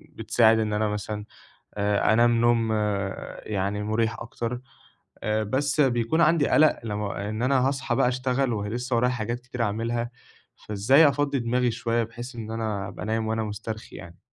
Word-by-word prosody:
بتساعد، 115 -1 +3
إن 105 -1 -1
أنا 105 0 +1
مثلًا، 105 0 -4 0.5
آآ، 105 +1 +2
أنام 120 0 +4
نوم 115 -1 +3 0.8
يعني، 100 +1 -1
مريح 110 +2 0
أكتر. 120 +1 -5 0.6
آآ، 110 0 0
بس 140 +7 0
بيكون 130 +4 +2
عندي 155 -2 +4
قلق، 155 0 +4
لمّا 105 -2 -3
إن 110 +2 -3
أنا 130 0 +3
هاصحى 135 -3 -1
بقى 135 -1 +3
أشتغل، 130 0 0
ولسه 115 +4 -2
ورايا 125 +2 +2
حاجات 120 0 -3
كتير 125 -1 -6
أعاملها. 115 +3 -2 0.4
فإزاي 125 +10 +4
أفضِّي 145 -1 0
دماغي 120 +1 +1
شوية، 115 +1 0
بحيث 120 +3 -8
إن 110 -1 -6
أنا 110 -3 -3
أبقى 95 - -7
نايم 110 +1 -1
وأنا 110 0 -1
مسترخي 110 +1 -6
يعني؟ 85 0 -11
115 Hz, 160 wpm, -25 LUFS, 105-125 Hz, 0.8 s, أنام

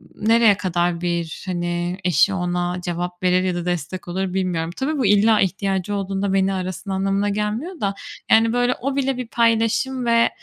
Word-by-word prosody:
nereye 225 -1 +4
kadar 175 -2 -1
bir, 170 -2 -3
hani, 175 -1 -2
eşi 180 +2 +3
ona 180 -1 -2
cevap 175 +1 -4
verir 180 0 +3
ya 180 -1 -1
da 175 - -4
destek 175 +1 -3
olur 185 +1 -3
bilmiyorum. 175 -3 -1
Tabii 295 +3 -1
bu 260 - 0
illa 210 +2 +4
ihtiyacı 195 +1 -1
olduğunda 195 0 -2
beni 195 0 +2
arasın 185 +1 -5
anlamına 195 +1 0
gelmiyor 215 - -3
da, 200 -1 0 0.4
yani, 225 +1 +5
böyle, 245 +1 +2
o 275 +1 -2
bile 270 -2 0
bir 250 -2 -5
paylaşım 235 +3 +1
ve 230 0 +4
195 Hz, 175 wpm, -21 LUFS, 180-225 Hz, 0.4 s, yani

